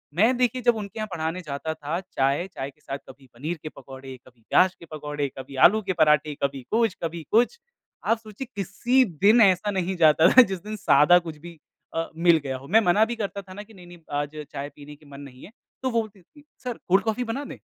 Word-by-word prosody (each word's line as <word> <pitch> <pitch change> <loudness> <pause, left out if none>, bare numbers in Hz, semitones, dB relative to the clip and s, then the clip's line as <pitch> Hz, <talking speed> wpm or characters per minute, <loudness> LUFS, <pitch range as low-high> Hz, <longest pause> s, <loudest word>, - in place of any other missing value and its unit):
मैं 225 +7 +4
देखिए, 250 0 +1
जब 240 -1 +3
उनके 210 +1 -7
यहाँ 215 - -3
पढ़ाने 165 +2 -3
जाता 155 +1 -4
था 155 +3 -4
चाय, 145 -1 -1
चाय 135 -7 -6
के 150 - -34
साथ 135 - -5
कभी 135 0 -15
पनीर 155 +8 -5
के 155 - -5
पकोड़े, 135 -2 -11
कभी 120 -2 -21
प्याज 185 0 +4
के 170 - -14
पकौड़े, 150 -1 -3
कभी 135 +1 -9
आलू 215 +4 -1
के 185 - +1
पराठे, 150 -1 +3
कभी 140 -1 -1
कुछ, 225 -3 +2
कभी 165 0 -4
कुछ। 245 - +2 0.5
आप 230 - +2
सोचिए, 220 +3 -9
किसी 240 +7 +2 0.2
दिन 225 +3 +7
ऐसा 195 +1 +4
नहीं 190 -1 -2
जाता 160 0 +5
था, 255 - +10
जिस 190 -6 -1
दिन 215 +1 -5
सादा 150 0 +5
कुछ 165 -3 -8
भी 170 0 -12 0.4
अ, 165 0 -2
मिल 170 0 +4
गया 130 -1 -3
हो, 135 +2 -13
मैं 220 +5 +5
मना 200 +3 +3
भी 240 +1 -4
करता 200 -2 -4
था 185 -1 -13
ना 205 +2 -8
कि 220 +1 -19
नहीं, 180 -3 -14
नहीं 175 0 -13 0.2
आज 145 +1 -2 0.2
चाय 145 0 -5
पीने 150 0 -12
के 150 - -22
मन 140 0 -11
नहीं 130 -2 -12
है। 205 - -14 0.3
तो 260 - +1
वो 230 -1 +1
बोलती 205 -3 -11
थी, 295 - -21 0.2
सर 245 -2 -4
कोल्ड 190 +2 +3
कॉफी 225 +2 -1
बना 245 +5 -4
दें, - - -9
175 Hz, 235 wpm, -25 LUFS, 150-215 Hz, 0.5 s, था